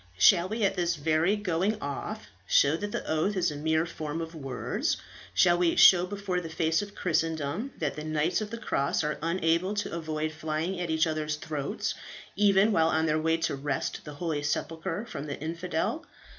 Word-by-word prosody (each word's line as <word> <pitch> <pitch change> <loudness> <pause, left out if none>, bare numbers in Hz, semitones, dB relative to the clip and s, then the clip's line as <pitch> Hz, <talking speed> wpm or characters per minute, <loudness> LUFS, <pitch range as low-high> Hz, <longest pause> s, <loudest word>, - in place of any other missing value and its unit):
Shall 170 - +6
we 220 +1 -2
at 195 - +3
this 175 -1 0
very 160 +5 +2
going 205 +1 0
off 210 +10 -5 0.2
show 140 +2 +4
that 205 +4 -4
the - - -4
oath 160 +6 +1
is 180 -3 +2
a - - -6
mere 160 +2 +1
form 155 -1 -5
of 165 0 -5
words? 135 -5 -2 0.4
Shall 175 - +5
we 175 -2 +3
show 180 -1 +7
before 195 -2 -2
the 165 - -7
face 160 +2 +1
of 205 0 -8
Christendom 165 - -1
that 150 -4 -2
the 150 - -6
knights 155 +5 0
of 210 - -4
the 230 - -5
cross 150 -10 0
are 150 0 -2
unable 170 +3 +1
to 205 - -2
avoid 155 -2 -2
flying 155 +4 -3
at 175 -1 -3
each 160 +1 +3
other's 155 -1 -1
throats, 150 -2 -3 0.4
even 200 +1 +4
while 160 -5 +3
on 160 0 +2
their 155 0 +1
way 165 +1 +2
to - - -1
wrest 135 0 -3
the 150 -1 -9
holy 160 -2 -2
sepulchre 165 +6 -2
from 155 -10 -6
the 145 - -5
infidel? 170 - -2
165 Hz, 195 wpm, -28 LUFS, 155-185 Hz, 0.4 s, show